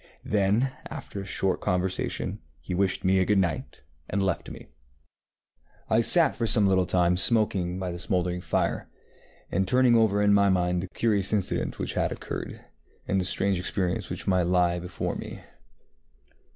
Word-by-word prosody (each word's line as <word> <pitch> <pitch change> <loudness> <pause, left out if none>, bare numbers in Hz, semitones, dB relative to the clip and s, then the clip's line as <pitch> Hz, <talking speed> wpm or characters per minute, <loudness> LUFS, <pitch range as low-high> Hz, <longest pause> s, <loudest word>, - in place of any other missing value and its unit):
Then, 105 +6 +1 0.2
after 100 - -7
a - - -8
short 95 -1 0
conversation, 90 +1 -2 0.2
he - - -6
wished 95 +1 0
me 95 0 +3
good 105 +2 +2
night 85 -5 -2 0.3
and 100 - -1
left 95 -3 -1
me. - - -10 1.3
I 110 +1 +4
sat 160 +5 +4
for 115 -3 -1
some 110 -2 +3
little 95 -2 +2
time 90 -1 +2
smoking 95 -5 +2
by 95 -1 -3
the 85 - -6
smouldering 90 -1 -1
fire, - - -1 0.6
and 95 +1 0
turning 125 +1 +4
over 105 -3 +3
in 100 0 +4
my 100 0 +4
mind 90 -1 +1
the 95 - -5
curious 105 -4 +2
incident 100 -3 0
which - - -3
had - - 0
occurred, - - -6 0.4
and 95 0 +1
the - - -2
strange 95 0 0
experience 90 +2 -2
which 90 +2 -5
might 90 -3 +2
lie 90 -1 +2
before 90 +1 -4
me. - - -8
95 Hz, 165 wpm, -26 LUFS, 90-105 Hz, 1.3 s, I